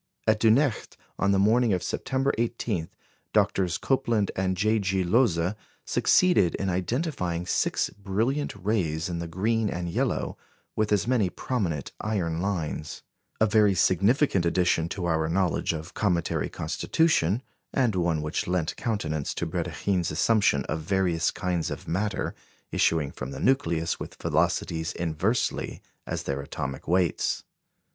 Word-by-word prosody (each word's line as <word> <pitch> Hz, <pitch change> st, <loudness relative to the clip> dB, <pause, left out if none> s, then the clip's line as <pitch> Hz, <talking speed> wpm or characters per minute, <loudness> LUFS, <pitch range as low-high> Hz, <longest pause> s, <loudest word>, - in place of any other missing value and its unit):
At 110 Hz, -1 st, +3 dB
Dunecht, 115 Hz, +3 st, +2 dB, 0.2 s
on 100 Hz, -, +3 dB
the 100 Hz, -, +3 dB
morning 110 Hz, +3 st, +4 dB
of 90 Hz, -, -1 dB
September 135 Hz, +1 st, -1 dB
18, 115 Hz, -7 st, -1 dB, 0.5 s
Drs. 90 Hz, -3 st, +2 dB
Copeland 120 Hz, -6 st, +1 dB
and 95 Hz, 0 st, 0 dB
J. 110 Hz, +3 st, +2 dB
G. 95 Hz, -1 st, 0 dB
Lohse 90 Hz, -3 st, +2 dB, 0.3 s
succeeded 140 Hz, -, +3 dB
in 95 Hz, -1 st, -1 dB
identifying 90 Hz, -, -1 dB
six -, -, 0 dB
brilliant 110 Hz, +9 st, -1 dB
rays 90 Hz, -5 st, -1 dB
in 85 Hz, -1 st, -3 dB
the 85 Hz, -, -4 dB
green 105 Hz, +6 st, 0 dB
and 85 Hz, -1 st, -3 dB
yellow -, -, -1 dB, 0.4 s
with 110 Hz, 0 st, 0 dB
as 105 Hz, -2 st, +2 dB
many 115 Hz, -6 st, +2 dB
prominent 90 Hz, -, -2 dB
iron 85 Hz, -6 st, -1 dB
lines; 85 Hz, -6 st, -3 dB, 0.4 s
a 110 Hz, -, +5 dB
very 105 Hz, -2 st, +4 dB
significant 100 Hz, -, +3 dB
addition 85 Hz, -1 st, +2 dB
to 90 Hz, -1 st, -3 dB
our 80 Hz, -2 st, +1 dB
knowledge 90 Hz, -1 st, +1 dB
of 80 Hz, +2 st, -6 dB
cometary 90 Hz, -5 st, 0 dB
constitution, 105 Hz, -, +1 dB, 0.3 s
and 125 Hz, -5 st, +2 dB
one 85 Hz, -4 st, 0 dB
which 75 Hz, +1 st, -2 dB
lent 90 Hz, -3 st, 0 dB
countenance 80 Hz, -, -2 dB
to -, -, -2 dB
Brédikhine's 85 Hz, +2 st, -1 dB
assumption 100 Hz, -2 st, +2 dB
of -, -, -2 dB
various 90 Hz, -1 st, +1 dB
kinds 90 Hz, -3 st, -2 dB
of -, -, -6 dB
matter 100 Hz, +5 st, -1 dB, 0.4 s
issuing 80 Hz, -4 st, +2 dB
from 65 Hz, -, -6 dB
the -, -, -7 dB
nucleus 85 Hz, -11 st, +1 dB
with -, -, -7 dB
velocities 80 Hz, -1 st, 0 dB
inversely 85 Hz, +8 st, -1 dB, 0.2 s
as -, -, -3 dB
their 70 Hz, 0 st, -2 dB
atomic 70 Hz, -1 st, -5 dB
weights. 90 Hz, 0 st, +1 dB
95 Hz, 140 wpm, -27 LUFS, 85-110 Hz, 0.5 s, a